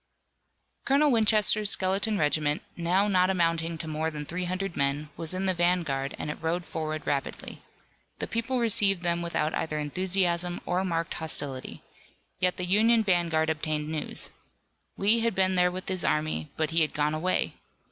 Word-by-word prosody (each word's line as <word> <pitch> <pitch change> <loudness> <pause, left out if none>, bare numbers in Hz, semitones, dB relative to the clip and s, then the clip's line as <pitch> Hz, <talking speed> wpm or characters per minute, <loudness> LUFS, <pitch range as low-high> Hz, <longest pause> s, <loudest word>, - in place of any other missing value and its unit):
Colonel 285 +2 +3
Winchester's 215 -2 +4
skeleton 195 +3 +1
regiment, 150 -1 +1
now 180 +4 +2
not 185 -2 +3
amounting 165 -2 0
to 160 - -6
more 155 +1 -1
than 150 -2 -6
three 180 +4 -3
hundred 185 +1 -3
men, 140 +2 0
was 165 +2 -2
in 190 +1 -2
the 190 - +2
vanguard 170 -6 0
and 150 - -3
it - - -9
rode 170 +2 -1
forward 155 -1 -4
rapidly. 140 -1 -3 0.6
The - - -3
people 230 +3 -2
received 205 -6 +2
them 170 0 +1
without 160 -2 -1
either 155 -1 -2
enthusiasm 175 +2 0
or 180 +1 0
marked 165 -3 -2
hostility. 145 -5 -5 0.6
Yet 180 -1 +1
the 180 - -2
Union 220 +5 +4
vanguard 170 -5 +2
obtained 155 -1 -2
news. 155 -1 -5 0.7
Lee 210 +4 +3
had 230 -3 0
been 190 0 +2
there 180 -1 +4
with 185 +1 -6
his 185 -2 -2
army, 150 - 0
but 160 0 0
he 165 +1 +3
had 155 - 0
gone 150 +1 +1
away! 175 +4 0
175 Hz, 165 wpm, -27 LUFS, 155-190 Hz, 0.7 s, Winchester's